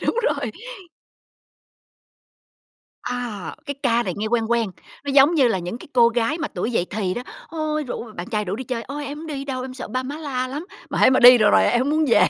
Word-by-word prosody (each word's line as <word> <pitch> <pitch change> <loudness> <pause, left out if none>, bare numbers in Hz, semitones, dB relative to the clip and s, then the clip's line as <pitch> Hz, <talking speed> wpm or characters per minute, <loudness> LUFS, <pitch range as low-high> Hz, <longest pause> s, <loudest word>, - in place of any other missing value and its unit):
Đúng - - 0
rồi. - - 0 2.5
À, 240 -6 -4
cái 285 - -3
ca 240 -3 +3
này 185 -6 -3
nghe 210 +2 -2
quen 230 0 +1
quen. 230 -4 +1 0.3
Nó 285 - -2
giống 280 +4 +6
như 265 -6 +4
là 195 - 0
những 180 +7 -5
cái - - -13
cô 235 -2 +6
gái 235 +6 0
mà 310 -2 -2
tuổi 190 +7 -3
dậy 180 -6 +1
thì 190 -3 -2
đó. 245 - -4 0.3
Ôi, 310 -2 -2
rủ 240 -2 -6
bạn 175 +2 -6
trai 210 -1 -1
rủ 195 +2 -3
đi 260 - -6
chơi, 235 -2 -3
"Ôi, 290 +4 -6
em 290 +1 -6
hổng 320 - -8
đi 280 -3 -5
đâu, 260 -2 -4
em 255 0 -7
sợ 255 - -7
ba 255 0 -2
má 275 +3 -5
la 260 -5 -3
lắm. 295 +6 -6 0.2
Mà - - -2
hễ - - +6
mà 260 - +3
đi 245 0 +10
được 210 -2 +5
rồi - - +5
em 240 - +3
hổng 270 +3 0
muốn 310 +1 +2
về", 235 - +5
250 Hz, 245 wpm, -22 LUFS, 230-285 Hz, 2.5 s, đi